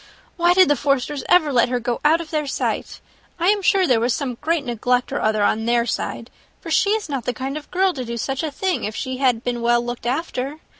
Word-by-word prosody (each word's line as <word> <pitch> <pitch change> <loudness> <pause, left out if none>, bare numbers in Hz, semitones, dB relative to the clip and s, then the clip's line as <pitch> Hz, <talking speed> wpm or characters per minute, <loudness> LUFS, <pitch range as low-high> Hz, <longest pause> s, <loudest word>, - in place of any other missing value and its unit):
Why 350 0 +3
did 370 0 +6
the 290 - +3
Forsters 280 0 -1
ever 310 -5 +4
let 240 -1 +3
her 250 -1 0
go 240 0 -3
out 310 +3 +4
of 335 -2 -8
their 305 -2 -1
sight? 270 - -3 0.4
I 345 +3 +3
am 415 0 +2
sure 390 -2 +3
there 250 -8 +3
was 235 +1 +1
some 255 -4 -4
great 320 -2 0
neglect 245 +2 0
or 285 - -1
other 215 -1 +1
on 220 +2 +1
their 235 0 +2
side, 230 0 -4 0.3
for 330 - -8
she 385 +5 +3
is 440 -1 -2
not 275 -6 -4
the 250 - -1
kind 270 +2 -4
of 305 -1 -7
girl 375 0 +2
to 260 - -5
do 235 0 -5
such 265 +3 -2
a 320 - -2
thing, 365 +6 -2
if 215 +1 -3
she 260 0 -4
had 250 -3 +1
been 240 -1 -2
well 240 0 +2
looked 240 0 -5
after. 275 0 -2
270 Hz, 250 wpm, -21 LUFS, 240-320 Hz, 0.4 s, did